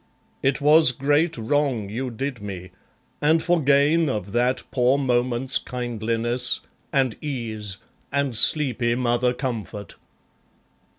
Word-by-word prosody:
It 135 +2 +1
was 150 -1 +6
great 145 +5 +1
wrong 130 -2 0
you 125 +6 -4
did 125 +1 -5
me; 95 -3 -7 0.5
and 160 +2 +3
for 175 -2 +2
gain 145 +3 +3
Of 105 -6 -4
that 125 +3 +1
poor 125 +1 +2
moment's 125 -1 0
kindliness, 120 0 -2 0.3
and 130 -4 +1
ease, 110 -8 -4 0.3
And 140 -3 -1
sleepy 125 -2 +3
mother 125 0 +1
comfort! 115 -5 -5
125 Hz, 115 wpm, -23 LUFS, 115-140 Hz, 0.5 s, was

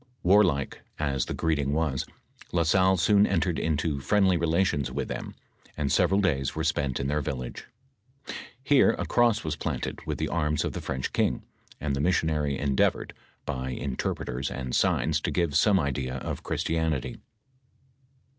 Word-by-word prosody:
Warlike 90 -8 +3 0.2
as 70 -4 0
the - - -3
greeting 75 -4 0
was, 75 -4 -1 0.4
La 85 -1 +2
Salle 95 +3 +4
soon 100 +4 +4
entered 85 -4 0
into 80 -2 0
friendly 95 +6 +3
relations 85 -5 +1
with 70 - -3
them, - - -5 0.4
and 70 -2 -1
several 95 +1 +3
days 70 -9 0
were 80 - -2
spent 75 -4 0
in 70 - -2
their 75 +2 0
village. 65 -4 -5 1.0
Here 135 0 +5
a - - -2
cross 120 -3 +2
was 80 -1 -2
planted - - -4
with - - -2
the - - -1
arms 75 -3 0
of - - -3
the - - -4
French 65 -1 -3
king, - - +1 0.4
and 70 -1 -1
the 70 - -1
missionary 75 -4 +1
endeavored, 70 -2 +1 0.3
by 65 -3 -3
interpreters 65 -1 -3
and 65 -2 -4
signs 75 -1 +2
to - - -1
give 85 -5 0
some 95 +4 +4
idea 65 -4 -2
of 70 - -4
Christianity. 80 -4 -1
75 Hz, 155 wpm, -27 LUFS, 70-85 Hz, 1.0 s, Here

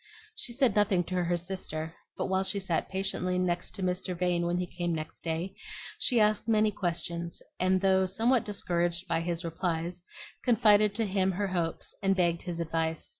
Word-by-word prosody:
She 340 - -3
said 245 -3 +2
nothing 200 -4 +3
to 180 +1 -1
her 175 0 +1
sister, 165 -3 -4 0.2
but - - -1
while 190 0 +1
she 190 +1 0
sat 180 -4 -1
patiently 190 -1 0
to 180 - +2 0.4
Mr. 180 0 -1
Vane 175 -1 +1
when 175 +1 0
he 180 - 0
came 175 -1 -2
next 155 0 -6
day, 165 +3 -3 0.5
she 245 -3 +4
asked 215 +1 +3
many 215 -1 +3
questions; 170 -3 -2 0.2
and 185 0 +3
though 190 -1 +4
somewhat 230 +6 +2
discouraged 175 -3 -1
by 165 - +1
his 170 0 -3
replies, 170 +1 -2 0.4
confided 210 -3 +5
to 225 0 +1
him 190 -1 +1
her 200 +2 -1
hopes 170 -3 -2
and 195 -1 +3
begged 170 -2 +1
his 175 -2 -5
advice. 165 -1 -1
180 Hz, 175 wpm, -30 LUFS, 170-195 Hz, 0.5 s, confided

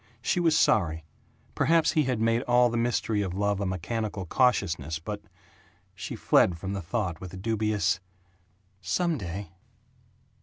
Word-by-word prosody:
She - - +1
was 165 -2 +3
sorry 80 -6 +2 0.5
Perhaps 160 +3 +3
he 155 -2 +2
had 125 -3 -1
made 115 +1 +2
all 120 0 +4
the - - -3
mystery 115 -2 0
of 95 -3 -3
love 100 0 0
a 100 - -1
mechanical 100 +2 -3
cautiousness 85 - +1
but 105 +6 -6 0.7
She - - -6
fled 85 - +3
from 95 +3 -5
the 100 - -3
thought 90 -2 -3
with 95 0 -8
a - - -7
dubious, 105 -2 0 0.8
"Some 155 - 0
day." 95 0 -6
105 Hz, 150 wpm, -27 LUFS, 95-120 Hz, 0.8 s, all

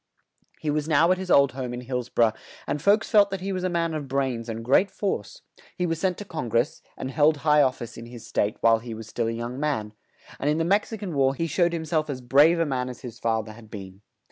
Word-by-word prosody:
He 150 - -1
was 150 0 -1
now 165 +2 +4
at 185 - +2
his 190 -1 -6
old 140 -5 +5
home 125 -1 -5
in 120 - -6
Hills 125 -1 -4
bor 120 - +4
ough, - - -9 0.3
and 150 - -2
folks 205 +5 +3
felt 205 -3 +6
that 195 -2 -4
he 195 +1 -3
was 185 -1 -3
a 185 - +1
man 170 -2 0
of 150 -3 -4
brains 130 -4 -1
and 115 0 -5
great 180 +10 +4
force; 210 - -4 0.3
he 180 - 0
was 165 -2 -1
sent 185 -1 0
to 205 - -7
Con 155 -10 -5
gress, 120 +6 0 0.2
and 130 - -4
held 150 +2 +3
high 150 -1 +6
of 130 -2 +3
fice 120 - -9
in 115 - -9
his 120 -1 -10
state 105 - -1
while 115 -1 +5
he 115 -1 -7
was 110 0 -9
still 115 +1 -2
a - - 0
young 120 +3 -5
man; 135 -8 -1 0.5
and 145 - 0
in 150 - +2
the 165 - +1
Mex 200 +6 +2
i 220 - -4
can 200 -5 -5
War 135 -1 +2
he 165 - -1
showed 170 +2 +2
him 165 -1 -3
self 155 -1 0
as 135 -3 -3
brave 145 +7 +4
a 165 - +2
man 130 -3 -2
as 125 - -9
his 120 -3 -9
fa 115 -1 0
ther 110 - -9
had 110 0 -14
been. 95 -2 -9
140 Hz, 275 wpm, -25 LUFS, 120-165 Hz, 0.5 s, felt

